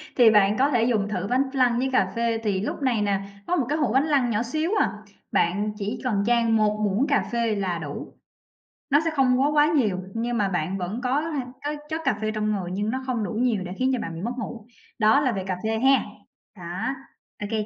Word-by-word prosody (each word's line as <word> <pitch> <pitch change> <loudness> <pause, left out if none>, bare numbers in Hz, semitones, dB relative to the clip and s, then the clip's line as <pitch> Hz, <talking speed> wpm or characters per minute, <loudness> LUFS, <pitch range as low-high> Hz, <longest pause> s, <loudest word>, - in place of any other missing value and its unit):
Thì 235 -4 +7
bạn 210 -1 +4
có 275 +2 +4
thể 240 -5 +2
dùng 220 -4 +1
thử 195 -2 -3
bánh 255 +2 +3
flan 250 -3 +3
với 265 +1 0
cà - - +2
phê, 230 -1 0
thì 195 -3 0
lúc 230 - -4
này 245 -5 +1
nè, 200 -1 0 0.3
có 355 - +1
1 275 -8 +1
cái 300 - +1
hũ 255 -7 0
bánh 270 +3 +3
flan 275 -5 +2
nhỏ 225 +1 0
xíu 310 +8 -2
à, - - +1 0.4
bạn 205 +5 +1
chỉ 210 +3 -3
cần 215 -6 0
chan 235 -1 +2
1 210 -1 +2
muỗng 210 +7 +1
cà 280 - +2
phê 235 -2 0
là 190 -4 -1
đủ. 145 -3 -7 0.8
Nó 285 - +5
sẽ 325 - +1
không 255 -2 +3
quá 280 - +4
quá 295 0 +5
nhiều 230 -12 +1
nhưng 235 +1 -2
mà 205 -3 +1
bạn 180 +1 -2
vẫn 195 +6 -4
có 260 +3 +1
h 315 -2 -3 0.3
có 295 +1 -1
chất 320 +1 -3
cà - - +2
phê 215 0 0
trong 215 0 -1
người 190 -4 -2
nhưng 205 +3 -1
nó 260 +3 -3
không 245 -4 -1
đủ 205 - -3
nhiều 225 -3 +1
để 180 - -7
khiến 260 +1 +2
cho 255 - 0
bạn 165 -6 -5
bị 165 - -6
mất 235 +5 -2
ngủ. 225 -1 -6 0.3
Đó 220 +4 +5
là 260 -3 +2
về 195 -4 -3
cà 185 -1 -2
phê 220 0 0
ha! 265 +2 +4 0.5
Đó, 180 +8 -3 0.5
ô 205 - -4
kê 215 -1 -1
225 Hz, 250 wpm, -25 LUFS, 205-260 Hz, 0.8 s, Thì